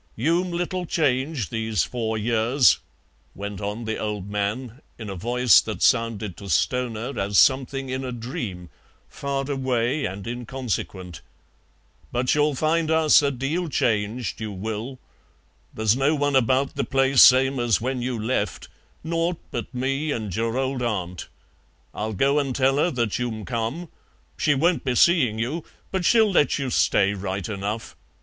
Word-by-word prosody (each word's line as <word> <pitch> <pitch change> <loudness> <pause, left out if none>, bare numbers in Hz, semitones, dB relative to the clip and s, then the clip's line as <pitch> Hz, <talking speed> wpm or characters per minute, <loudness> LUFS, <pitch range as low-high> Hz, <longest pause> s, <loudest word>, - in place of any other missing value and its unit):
"You'm 170 +9 +1
little 175 +1 -3
changed 140 - 0
these 110 -4 0
four 110 -3 -3
years," 115 +4 +3 0.6
went 100 0 -6
on 105 +3 -4
the 110 0 -3
old 105 -3 -3
man, 110 +5 -3 0.2
in 110 -4 -7
a - - -5
voice 120 +4 +4
that - - -5
sounded 110 -5 +1
to 100 - -9
Stoner 120 - -1
as 100 0 0
something 135 0 +3
in 130 +1 -3
a 130 - -4
dream, 110 -7 -6 0.4
far 140 -1 -3
away 130 +1 0
and 95 +1 -5
inconsequent; 115 -7 -5 0.9
"but 125 +1 +1
you'll 150 -1 +2
find 160 +3 +1
us 160 -2 +5
a 140 - +1
deal 145 +7 -2
changed, 110 -3 -1
you 110 -1 -4
will. 110 +6 -5 0.7
There's 110 0 +1
no 135 +4 +2
one 145 -1 0
about 130 +2 +2
the - - -1
place 135 0 +3
same 130 +1 +6
as 120 -4 +2
when 130 +1 -2
you 125 -1 -2
left; 115 +4 -2 0.3
nought 165 +1 -1
but - - -5
me 135 +4 -2
and 110 -8 -3
your 115 +2 -1
old 130 -1 -1
Aunt. 90 -7 -3 0.7
I'll 110 +1 -3
go 140 +8 +2
and 135 -3 -2
tell 135 0 +2
her 160 +4 +3
that 120 -7 -1
you'm 110 -4 -3
come; 120 +9 -3 0.5
she 145 -2 +2
won't 165 +5 +1
be 130 -2 -1
seeing 130 -9 +4
you, 135 +9 -2 0.3
but 190 -2 -1
she'll 220 -1 +4
let 150 -6 +3
you 135 -3 -3
stay 100 -3 +3
right 95 -1 -4
enough. 105 +2 -4
125 Hz, 155 wpm, -24 LUFS, 110-140 Hz, 0.9 s, same